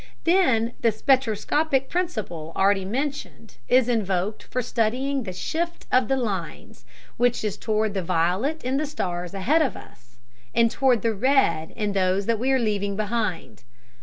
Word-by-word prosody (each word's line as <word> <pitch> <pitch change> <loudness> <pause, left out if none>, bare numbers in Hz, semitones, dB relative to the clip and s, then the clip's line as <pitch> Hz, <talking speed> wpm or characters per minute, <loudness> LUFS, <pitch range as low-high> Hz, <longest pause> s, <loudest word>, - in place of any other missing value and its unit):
Then 260 -11 +3
the 230 - +4
spectroscopic 265 +4 +1
principle 205 - -3
already 195 0 +2
mentioned 260 -1 -4
is 255 -1 +4
invoked 205 -3 -1
for 250 - -3
studying 250 +5 0
the 185 - -4
shift 335 - -3
of 255 -3 +3
the 270 - +1
lines, 215 -7 -5 0.3
which 245 -1 +1
is 210 -2 -1
toward 215 -1 -1
the 195 - -1
violet 185 - 0
in 255 +2 0
the 305 +1 -1
stars 180 - -4
ahead 265 +13 +2
of 275 - 0
us 120 0 -16 0.4
and 230 -1 +4
toward 255 -6 +2
the 230 -1 +1
red 200 - +2
in 210 -2 -1
those 190 0 +1
that 230 0 0
we 260 +3 +1
are 265 - +4
leaving 205 -4 -1
behind. 210 - -3
225 Hz, 160 wpm, -24 LUFS, 195-265 Hz, 0.4 s, the